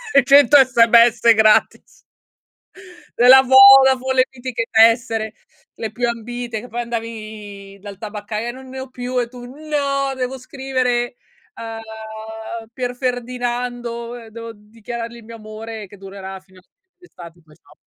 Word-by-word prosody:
e 275 - +6
100 285 +2 +6
SMS 235 -2 +5
gratis. 215 -1 +1 1.1
Della 255 +2 +7
Vodafone 265 0 +6
le 255 - +5
mitiche 245 -3 -5
tessere, 225 -1 +2 0.4
le 220 -1 -6
più 240 +1 -2
ambite 235 0 -5
che 245 - -11
poi 240 +1 -5
andavi 215 -4 -8
dal 200 -1 -10
tabaccaio 215 +1 -6
e - - -3
"non 260 +1 -13
ne 265 0 -9
ho 265 - -9
più" 250 0 -5
e 240 - -2
tu: 245 -1 -11
"No, 275 -1 -3
devo 260 +1 -4
scrivere 255 -2 -2 0.4
a 225 - -8 0.9
Pierferdinando, 245 -1 -4
ehm, 230 -2 -11
devo 230 +1 -9
dichiarargli 230 +2 -9
il 230 - -14
mio 230 +1 -11
amore 215 -1 -9
che 205 - -15
durerà 195 0 -9
fino 185 -1 -21
a - - -25 0.3
d'estate 175 - -15
poi 155 -1 -21
ciao." - - -24
235 Hz, 140 wpm, -19 LUFS, 220-255 Hz, 1.1 s, Della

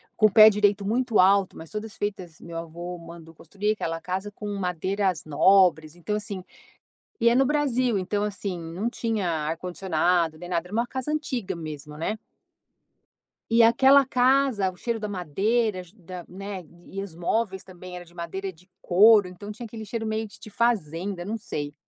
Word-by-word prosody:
com 215 - +5
o 210 - -4
pé 215 +1 +9
direito 205 -1 +2
muito 235 +2 +1
alto, 195 0 +4
mas 160 - -9
todas 215 0 -5
feitas 185 -5 -5
meu 170 -1 -8
avô 170 +2 -6
mandou 165 -1 -12
construir 200 +6 -2
aquela 165 -6 -3
casa 190 +4 -4
com 210 +1 -8
madeiras 185 0 -1
nobres, 160 0 +4
então, 210 +5 -3
assim 205 -3 -4 0.8
e 235 - +5
é 235 - +4
no 270 0 +4
Brasil. 255 -6 +1
Então 205 +2 -1
assim, 200 -2 -3
não 175 +8 -3
tinha 220 -7 -1
ar-condicionado 165 +1 0
nem 175 +2 -9
nada, 170 -1 -1
era 180 - -14
uma 235 - +1
casa 260 +4 -4
antiga 245 - -2
mesmo, 150 -2 -8
né. 210 +7 -2 1.3
E 230 0 +6
aquela 265 +4 +6
casa 255 -5 +3
o - - -17
cheiro 230 +3 -2
da 210 - -3
madeira 200 +4 0
da 180 -2 -9
né, 195 0 -7 0.2
e 195 +1 -6
os 185 -5 -8
móveis 190 +2 -1
também 185 -1 -11
era 175 - -8
de 170 - -20
madeira 185 +3 -5
de 180 +4 -23
couro, 205 +2 +6
então 185 +3 -9
tinha 230 +3 -8
aquele 220 0 -8
cheiro 225 +1 -4
meio 220 0 -2
de 205 - -14
de 215 - -11
fazenda, 190 -5 -1
não 215 +3 -3
sei. 145 -9 -4
195 Hz, 180 wpm, -25 LUFS, 175-220 Hz, 1.3 s, pé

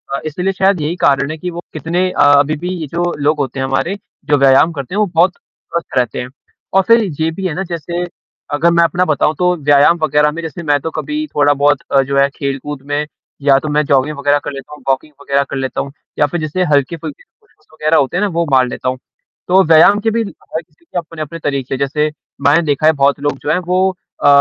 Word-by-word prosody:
अ, - - -2
इसलिए 180 +5 -2
शायद 190 -3 +2
यही 155 +4 -2
कारण 140 +1 +2
है 160 - -5
कि 180 +3 -5
वो 170 - -7
कितने 170 +4 -1
अ - - 0 0.2
अभी 150 +2 +1
भी 175 +3 -4
ये 155 - -5
जो 175 +3 -1
लोग 150 +1 +2
होते 135 -1 -3
हैं 130 - 0
हमारे, 150 +9 -1 0.3
जो 145 -1 +3
व्यायाम 135 +4 +5
करते 140 +6 -6
हैं - - 0
वो 210 - +3
बहुत 175 +2 +4
स्वस्थ 170 -5 -7
रहते 125 -2 0
हैं। 125 - -7 0.4
और 195 - +5
फिर 230 -1 +5 0.2
ये 160 - +2
भी 190 +3 -6
है 160 - -3
ना 190 - -2
जैसे, 170 +1 -3 0.5
अगर 170 +4 +3
मैं 170 0 +4
अपना 180 +2 +1
बताऊँ 155 0 +1
तो 180 0 +2
व्यायाम 145 +2 +4
वगैरह 150 0 +3
में 165 +2 -6
जैसे 165 +1 -7
मैं 145 -1 +2
तो 160 - -3
कभी 305 - -3
थोड़ा-बहुत 145 -1 +3
अ, 135 -1 +5
जो 140 +1 -2
है 140 0 +4
खेल-कूद 140 0 -4
में, 145 +1 -1 0.4
या 140 -1 +5
तो 155 - -6
मैं 150 +1 +2
जॉगिंग 140 +1 +1
वगैरह 145 +1 +2
कर - - -4
लेता 140 +2 -9
हूँ, 150 - -12
वॉकिंग 140 +3 -1
वगैरह 140 0 +1
कर 140 - -4
लेता 130 0 -2
हूँ, 140 - -7 0.3
या 150 - +5
फिर 175 +4 -3
जैसे 155 +4 -1
हल्के-फुल्के 165 - -1 0.2
पुश-अप्स 290 - -33
वगैरह 155 +1 +1
होते 140 +6 +1
हैं - - 0
ना, 210 - +2
वो 170 -2 -1
मार 130 -1 +4
लेता 130 - -3
हूँ। 130 - -3 0.5
तो 190 +1 +5
व्यायाम 165 +6 +6
के - - +6
भी 230 +1 0
ल 200 - -6
अ, - - -22 0.2
हर 160 - 0
किसी 155 +2 -34
के 175 - -7
अपने-अपने 165 -1 -5
तरीक़े 135 -3 -2
जैसे, 150 +2 0 0.3
मैंने 145 +4 +4
देखा 145 +1 0
है 160 - +6
बहुत 140 0 +2
लोग 145 -1 -1
जो 150 - -5
हैं, 170 - +2
वो 185 +2 +1 0.3
अ - - +5
150 Hz, 245 wpm, -16 LUFS, 140-170 Hz, 0.5 s, व्यायाम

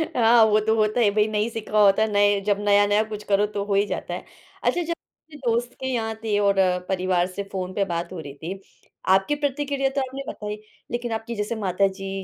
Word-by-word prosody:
हाँ 230 -1 +6
वो 215 0 +4
तो 220 +1 +1
होता 215 +1 +1
है 225 -4 +5
भाई 210 +1 +2
नहीं 215 +1 0
सीखा 215 -2 -2
होता, 205 +1 +5
नए 205 -1 +3
जब 205 -1 +1
नया-नया 205 +1 +3
कुछ 210 -1 -6
करो 205 0 +2
तो 205 -1 -3
हो 205 - -1
ही 200 +1 +3
जाता - - -4
है, - - -6 0.4
अच्छा 350 - +1
जब 335 +1 -2 0.5
दोस्त 240 +1 0
के 260 - -3
यहाँ 225 -2 -2
थे 215 -2 +1
और 200 -1 +3 0.3
परिवार 185 -1 +1
से 190 +2 -5
फ़ोन 185 -1 -4
पे 200 - +1
बात 170 -1 -3
हो 180 - -6
रही 145 -3 -8
थी 175 +6 -6 0.5
आपकी 195 +9 +3
प्रतिक्रिया 285 -1 -1
तो 275 +1 -1
आपने 265 +1 -5
बताई, 210 0 -6 0.3
लेकिन 240 0 -3
आपकी 225 +1 -4
जैसे 210 +2 -2
माता 195 -2 +1
जी 195 -1 -5
210 Hz, 215 wpm, -24 LUFS, 200-230 Hz, 0.5 s, हाँ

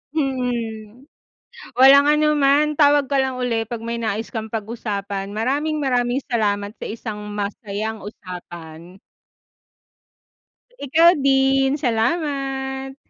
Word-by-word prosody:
Mm. 245 -5 -3 0.7
Walang 275 +2 +7
anuman. 300 -1 +3
Tawag 290 -1 +5
ka 275 - +3
lang 265 -1 0
uli 235 -3 -1
'pag 230 0 -6
may 235 0 -3
nais 220 0 -3
kang 220 -2 -4
pag-usapan. 205 -3 -4
Maraming 290 +7 -1
maraming 250 0 0
salamat 205 -4 -1
sa - - -6
isang 220 -1 -6 0.2
masayang 210 +1 -4
usapan. 175 -3 -10 1.9
Ikaw 325 +5 +6 0.2
din. 270 0 +3
Salamat! 270 +1 -2
245 Hz, 100 wpm, -21 LUFS, 215-275 Hz, 1.9 s, Walang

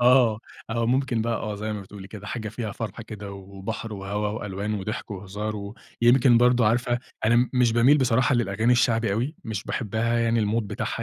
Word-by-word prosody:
آه، 120 -3 +5 0.3
آه. 115 0 0
ممكن 125 -2 +1
بقى 115 +1 0
آه. 105 -1 -4
زي 105 +1 -4
ما 105 - -4
بتقولي 95 0 -11
كده، 105 -1 -9
حاجة 110 +1 -4
فيها 110 -1 -4
فرحة 115 +1 -5
كده 105 -2 -8
و 100 - -8 0.2
وبحر 110 +3 -5
وهَوا 100 +1 -3
وألوان 105 0 -3
وضحك 105 +2 -4
وهزار 105 +1 -5 0.3
ويمكن 120 0 +6
برضه 125 -1 +4
عارفة 120 +2 +2 0.3
أنا 115 +2 +4
م 125 +1 +3
مش 120 -2 +4
باميل 125 +6 +5
بصراحة 130 0 +3
للأغاني 115 0 +2
الشعبي 115 -3 +2
أوي، 125 +9 -1
مش 105 -3 -4
باحبها 115 0 -1
يعني 115 0 +2
الMood 115 +3 +1
بتاعها 105 - -4
110 Hz, 190 wpm, -25 LUFS, 105-120 Hz, 0.3 s, ويمكن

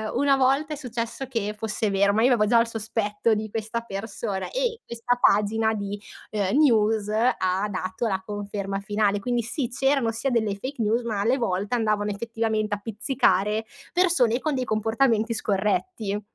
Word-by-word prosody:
una 275 +2 +4
volta 275 +4 +2
è - - -3
successo 240 -2 -4
che 220 -5 -2
fosse 220 0 -1
vero, 200 +1 +3
ma 220 - +2
io 240 - +5
avevo 210 -3 +3
già 235 +1 +5
il 230 - +2
sospetto 220 -1 -1
di 215 0 -2
questa 225 +2 -3
persona 200 -2 -4
,e - - -2
questa 235 +1 -1
pagina 220 +1 +3
di, 205 -1 -4 0.3
uhm, 205 +2 0
news 220 -7 +3
ha 210 -3 +1
dato 185 +3 -3
la 190 -3 -1
conferma 200 -1 -4
finale, 205 0 0
quindi 240 +3 0
sì, 240 +2 -3
c'erano 270 -2 +1
sia 230 +5 -2
delle 220 -4 +1
fake 260 +5 -5
news 225 +3 +1
ma 215 -4 -2
alle 240 +6 +2
volte 200 -1 -1
andavano 215 -3 +1
effettivamente 220 0 -1
a - - -9
pizzicare 215 -1 +1 0.3
persone 330 -10 +3
con 310 +2 -1
dei 255 -1 -1
comportamenti 225 +1 +1
scorretti. 210 - -1
220 Hz, 170 wpm, -25 LUFS, 205-240 Hz, 0.3 s, io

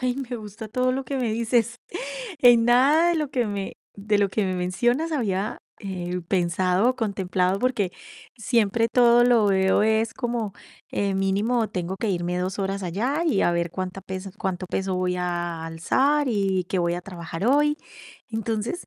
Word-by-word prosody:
Ay, 255 0 0
me 255 -3 -4
gusta 215 0 -9
todo 255 +3 +1
lo 265 +1 -2
que 275 +1 -3
me 240 -4 0
dices. 235 +1 +1 0.6
En 240 -3 +6
nada 275 +8 +5
de 345 - +2
lo 300 -3 -2
que 250 -4 0
me 200 -2 -4 0.2
de 205 +1 0
lo 200 -1 +2
que 215 - 0
me 185 - -1
mencionas 240 - 0
había, 210 -6 -1 0.2
eh, 180 -3 -4
pensado 180 +3 +2
o 255 - 0
contemplado, 190 -4 0
porque 220 -6 0 0.5
siempre 230 -1 +2
todo 240 -1 +5
lo 240 -3 +4
veo 190 0 +3
es 220 +1 +1
como, 235 -5 -3 0.4
eh, 200 -1 0
mínimo, 205 +5 +1
tengo 185 -2 -4
que 225 - 0
irme 180 -1 -1
2 185 +2 -3
horas 195 0 -2
allá 230 - -1
y 290 -11 +2
a - - +3
ver 170 0 -1
cuánta 185 +2 -5
peso 190 +1 -6
cuánto 185 -1 -2
peso 190 +1 -2
voy 180 0 0
a 175 -2 -3
alzar 265 - +1
y 195 -5 +1
qué 190 - 0
voy 170 -1 +1
a 175 - -5
trabajar 170 0 -5
hoy. 295 +3 +3 0.5
Entonces, 225 - -3
205 Hz, 180 wpm, -24 LUFS, 185-240 Hz, 0.6 s, En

